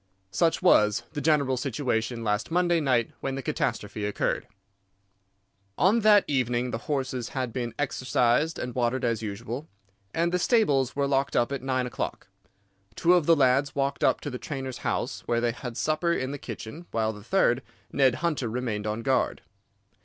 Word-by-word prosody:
Such 165 - +1
was 110 - +4
the 145 - -3
general 140 -4 +2
situation 120 -3 -2
last 105 0 -1
Monday 175 0 +2
night 125 -6 +1
when 135 -1 -3
the 135 - -5
catastrophe 105 - -2
occurred. 105 0 -1 1.3
"On 200 +6 +4
that 210 -2 +6
evening 125 -2 0
the 115 - -3
horses 130 -4 -2
had 125 -3 -2
been 120 -2 -3
exercised 130 +2 +1
and 125 0 -4
watered 125 +1 0
as 115 -2 0
usual, 115 +7 -5 0.4
and 170 +6 0
the 180 - +1
stables 145 - +2
were 140 0 +1
locked 140 0 0
up 120 +2 +2
at 140 - -3
nine 130 -1 0
o'clock. 125 - -4 0.7
Two 175 - +4
of 175 -4 +3
the 165 - +7
lads 135 0 +2
walked 140 0 -1
up - - +3
to 145 - -5
the 125 - -5
trainer's 135 -6 -5
house, - - -2
where 120 - +1
they 120 0 +1
had 120 0 -7
supper 155 +6 +1
in 130 -5 -1
the 145 - -5
kitchen, 125 +9 -8
while 110 -1 0
the 105 -1 -12
third, 130 - +2 0.3
Ned 130 -3 +3
Hunter, 145 -8 0
remained 110 -3 -3
on 110 +2 -3
guard. 130 +1 0
130 Hz, 175 wpm, -27 LUFS, 120-145 Hz, 1.3 s, the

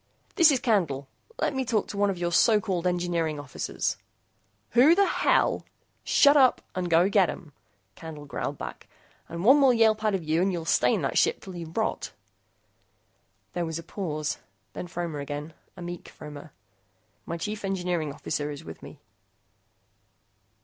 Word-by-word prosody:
"This 335 -5 +6
is 275 -4 +3
Candle. 165 - 0 0.3
Let - - 0
me 265 -1 -1
talk 230 -4 0
to 200 - -6
one 205 0 +3
of 190 - -2
your 175 0 -1
so 215 +5 +5
called 185 -4 -2
engineering 175 -4 -1
officers." 145 -3 -3 0.7
"Who 265 +8 +6
the 400 +1 +4
hell - - +2 0.2
" - - -44
"Shut 285 0 +5
up 265 -3 +5
and 180 -1 -2
go 170 +2 +5
get 195 -3 +3
'em," 155 - -8 0.4
Candle 150 +3 -9
growled 145 - -4
back. - - -8 0.4
"And 170 +3 -5
one 270 +5 +7
more 265 -3 +5
yelp 220 -1 +3
out 215 -2 +2
of 185 - -3
you 160 +2 +1
and 195 +1 +2
you'll 170 -3 -4
stay - - +3
in - - -3
that - - +1
ship 470 - +2
till 190 -3 -10
you 170 -2 -6
rot." 160 - -2 1.4
There 175 - -1
was 160 -1 -3
a 165 - -7
pause, 155 -5 -3 0.3
then 180 - -6
Fromer 170 -3 -4
again, 145 +2 -6 0.2
a 180 - -7
meek 175 0 -7
Fromer. 150 +1 -11 0.8
"My 170 - -3
chief 210 +5 -4
engineering 180 -5 -1
officer 150 +1 -3
is 145 -1 -7
with 80 0 -10
me." - - -11
175 Hz, 175 wpm, -27 LUFS, 160-210 Hz, 1.4 s, one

